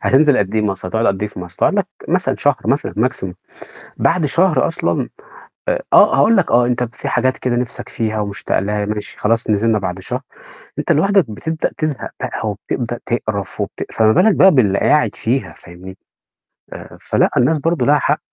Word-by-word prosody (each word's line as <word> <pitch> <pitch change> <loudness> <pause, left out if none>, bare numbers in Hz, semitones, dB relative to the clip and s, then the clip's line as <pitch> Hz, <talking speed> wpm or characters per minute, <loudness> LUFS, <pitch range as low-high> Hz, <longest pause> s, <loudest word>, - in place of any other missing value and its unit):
هتنزل 145 +1 +4
قد 100 +1 -1
إيه 110 - +1
مصر؟ 95 -3 -2
هتقعد 110 +4 0
قد 95 -1 0
إيه 105 - -1
في 90 - -9
مصر؟ 90 -1 -10
تقعد - - +2
لك - - +1 0.2
مثلًا - - +1
شهر - - +2
مثلًا - - 0 0.2
maximum، 95 -1 -3 0.6
بعد 170 -4 +1
شهر 165 -1 +3
أصلًا، 165 - -1 0.6
آآ - - 0
آه، - - +6
هاقول 225 0 +4
لك 190 - +1
آه، 120 +1 +4
أنت 125 0 0
في - - -4
حاجات 130 +2 0
كده 125 -1 -1
نفسك 125 -1 -3
فيها 110 -2 -2
ومشتاق 100 -1 -2
لها 105 +1 -1
ماشي، 105 0 -4
خلاص 115 +1 +1
نزلنا 110 +1 +2
بعد 95 -1 -4
شهر، 125 +6 -2 0.6
أنت - - +1
لوحدك 195 - +2
بتبدأ 160 +9 -3
تزهق 155 -4 -3
بقى 110 - -3
وبتبدأ 120 +3 -4
تقرف 110 -4 -3
وبت - - -4
فما 110 -1 +3
بالك 215 - +4
بقى 190 - +6
باللي 105 -7 +3
قاعد - - +2
فيها، - - -2
فاهمني؟ 90 +2 -12 0.8
آآ - - -11
فلأ - - +1
الناس 150 +5 +3
برضه 165 +2 0
لها 145 +1 +4
حق. 150 - 0
115 Hz, 185 wpm, -17 LUFS, 105-145 Hz, 0.8 s, آه